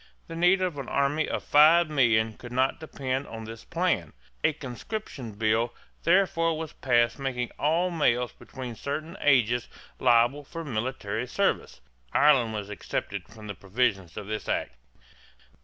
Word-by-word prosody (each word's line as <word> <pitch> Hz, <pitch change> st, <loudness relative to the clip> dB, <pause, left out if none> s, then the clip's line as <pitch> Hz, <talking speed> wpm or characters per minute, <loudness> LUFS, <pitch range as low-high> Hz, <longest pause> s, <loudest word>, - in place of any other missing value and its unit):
The 165 Hz, -, -8 dB
need 180 Hz, +3 st, +4 dB
of 175 Hz, -6 st, -2 dB
an 135 Hz, -, -6 dB
army 140 Hz, +3 st, +1 dB
of -, -, -2 dB
five 160 Hz, +3 st, +6 dB
million 115 Hz, -7 st, +3 dB
could 120 Hz, +2 st, -11 dB
not 130 Hz, +2 st, +1 dB
depend 135 Hz, -3 st, -3 dB
on 115 Hz, 0 st, -7 dB
this 115 Hz, +1 st, -9 dB
plan. 165 Hz, -, -1 dB, 0.3 s
A -, -, +4 dB
conscription 135 Hz, -, -6 dB
bill 110 Hz, +3 st, +1 dB, 0.3 s
therefore 165 Hz, -3 st, +3 dB
was 160 Hz, -1 st, -6 dB
passed 120 Hz, -1 st, +2 dB
making 125 Hz, -3 st, -2 dB
all 170 Hz, +4 st, +2 dB
males 125 Hz, -7 st, +1 dB
between 130 Hz, -2 st, -8 dB
certain 150 Hz, +8 st, -5 dB
ages 120 Hz, -4 st, +3 dB, 0.3 s
liable 120 Hz, +3 st, +4 dB
for 165 Hz, +4 st, -7 dB
military 120 Hz, -2 st, -3 dB
service. -, -, -1 dB, 0.3 s
Ireland 135 Hz, -6 st, +5 dB
was 105 Hz, -1 st, -5 dB
excepted 100 Hz, -1 st, -4 dB
from 110 Hz, -2 st, -12 dB
the 100 Hz, -, -5 dB
provisions 95 Hz, -2 st, -1 dB
of 105 Hz, -, -5 dB
this 110 Hz, +1 st, -4 dB
act. -, -, -1 dB
130 Hz, 150 wpm, -27 LUFS, 115-155 Hz, 0.3 s, five